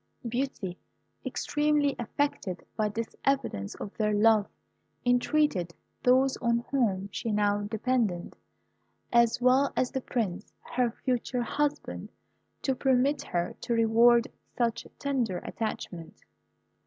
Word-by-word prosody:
Beauty, 235 -7 -3 0.4
extremely 295 -1 +1
affected 240 -6 -2
by 215 -1 +1
this 225 +2 -5
evidence 260 - 0
of 205 - -7
their 210 -1 +1
love, 215 -1 +4 0.6
entreated 245 - +2 0.3
those 260 +2 +4
on 235 0 0
whom 205 -8 +1
she 230 - -3
now 205 0 +2
depended, 220 -5 -1 0.8
as 235 -1 +4
well 255 +3 +4
as 255 - +1
the 265 - -2
Prince, 205 -6 -3 0.2
her 245 -1 +2
future 245 +1 -2
husband, 295 +4 -2 0.5
to 270 - +2
permit 265 +2 +2
her 175 -1 -2
to 235 - -1
reward 230 +1 +5 0.3
such 230 -1 0
tender 250 -9 -1
attachment. 175 -6 -5
235 Hz, 115 wpm, -29 LUFS, 210-260 Hz, 0.8 s, reward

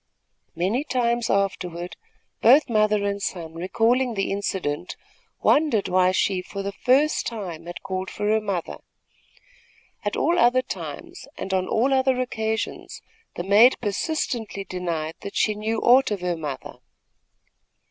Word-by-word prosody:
Many 195 - 0
times 240 -4 0
afterward, 180 -3 -1 0.5
both 265 +3 +6
mother 215 -2 +2
and 200 0 -2
son, 165 -4 -4
recalling 230 +8 +1
the 195 - -1
incident, 185 -5 -3 0.5
wondered 290 -10 +3
why 185 0 +3
she, 190 0 +1
for 195 +2 -6
the 200 - -3
first 265 +8 +2
time, 180 -8 -6
had 175 - -8
called 190 -1 -4
for 205 - -4
her 220 +1 +2
mother. 195 -5 -3 1.3
At - - -2
all 345 +1 +2
other 255 -1 +4
times - - -7
and 190 - -4
on 185 -1 +1
all 255 +5 +2
other 260 -1 +2
occasions, 220 -3 -3 0.3
the 175 - -3
maid 210 +7 +6
persistently 225 - -2
denied 170 -4 -4
that 200 - -7
she 215 - +2
knew 215 +2 -2
aught 255 +3 +5
of 205 -3 -3
her 180 -1 -1
mother. 145 -5 -6
205 Hz, 140 wpm, -24 LUFS, 185-240 Hz, 1.3 s, both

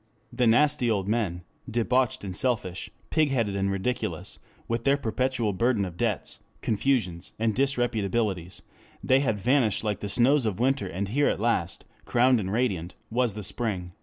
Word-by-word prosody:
The 120 0 +2
nasty 140 +1 +4
old 100 -4 0
men, 100 -6 -1 0.3
debauched 125 +2 +1
and 95 -2 -5
selfish, 100 -7 -1 0.2
pigheaded 135 -10 +1
and 100 0 0
ridiculous, 100 +6 -3 0.3
with 115 0 -2
their 140 +2 +3
perpetual 125 -3 -1
burden 115 0 +1
of 90 -2 -7
debts, - - -2 0.2
confusions, 100 -7 0
and 110 0 +1
disreputabilities 110 -8 -1 0.4
they 130 +1 +4
had 120 -6 0
vanished 120 -1 +2
like 105 -3 -1
the 100 - -5
snows 125 +3 +3
of 105 -1 -2
winter 130 -3 +1
and 95 +2 -3
here 145 +6 +2
at - - -1
last, 105 -6 -1 0.2
crowned 125 0 +3
and 95 -2 -3
radiant, 100 -7 -1 0.2
was 120 -2 +1
the 105 - -5
spring." 100 -3 -2
115 Hz, 160 wpm, -27 LUFS, 100-125 Hz, 0.4 s, nasty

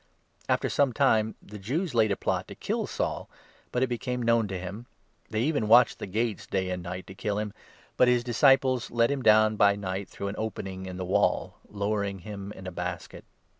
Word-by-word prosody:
After - - +2
some 140 -3 +2
time 110 0 +2
the 105 +1 -10
Jews 145 - -2
laid 110 -3 +3
a - - +2
plot - - -2
to - - -9
kill - - -2
Saul, - - -3 0.4
but 125 - +1
it - - +5
23 - - -7
became 125 +1 -3
known 115 -2 +3
to 95 -1 -4
him. 100 +7 -7 0.4
They 110 0 -1
even 145 -6 0
watched 120 +3 +6
the - - -5
gates 110 +2 -2
day 95 -1 -1
24 - - -1
and 90 - -4
night, 90 +1 -6
to 95 - -10
kill 100 +1 -2
him; 105 -1 -3 0.4
but 125 - +5
his 125 -1 +3
disciples 130 0 +3
let 115 +2 +2
him 140 -2 -1
down 110 -2 +5
by 100 -1 +5
25 - - -8
night 95 0 -4
through 100 - -5
an 100 - -5
opening 95 -3 -5
in 90 -1 -6
the 95 - -4
wall, 90 - +1
lowering 100 -1 -2
him 100 +1 -8
in 95 - -11
a 90 - -5
basket. 90 -1 -6
105 Hz, 220 wpm, -28 LUFS, 95-120 Hz, 0.4 s, watched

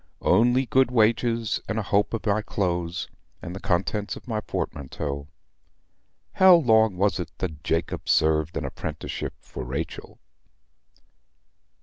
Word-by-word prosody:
Only 120 +7 +4
good 130 +2 +3
wages, 115 -1 +1
and 110 - -1
a 110 - 0
hope 100 +3 +1
of 115 - -6
my 105 0 +2
clothes, 90 -4 -2 0.3
and 90 0 -7
the - - -6
contents 100 +3 -1
of - - -13
my 110 -3 -2
portmanteau. 70 -4 -4 1.0
How 190 -1 +7
long 110 - +4
was 100 0 +1
it 90 - -4
that 80 -5 -5
Jacob 80 0 -2
served 80 0 +2
an - - -3
apprenticeship - - -5
for - - -8
Rachel?" 70 +6 -5
100 Hz, 130 wpm, -25 LUFS, 85-115 Hz, 1.0 s, How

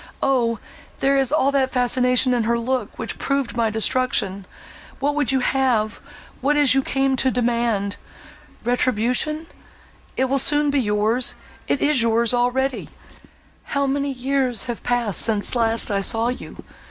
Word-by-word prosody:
Oh! 240 -4 +1 0.4
there 275 +1 +2
is 270 -1 +1
all 280 -2 +2
that 270 -2 +1
fascination 250 0 +2
in 235 -2 0
her 235 +1 +1
look, 240 -2 -3
which - - -6
proved 275 -3 -2
my 230 -2 +1
destruction! 215 -4 0 0.5
What 285 +2 0
would 290 -4 0
you 265 -1 +1
have—what 255 +3 -1
is 290 -2 +3
it - - +7
you 270 - +3
came 270 0 0
to 260 - +2
demand—Retribution?—It 240 +5 -2
will 275 +1 0
soon 295 +2 +2
be 285 - +1
yours—it 220 +5 -1
is 290 -4 +4
yours 230 +1 +2
already. 250 +2 0 0.9
How 280 - +2
many 280 +1 -1
years 260 -3 -1
have 240 -2 -5
passed, 240 -5 0
since 215 -3 +2
last 230 -2 +1
I 200 -1 0
saw 225 +4 +1
you! 250 - -7
250 Hz, 140 wpm, -21 LUFS, 230-270 Hz, 0.9 s, it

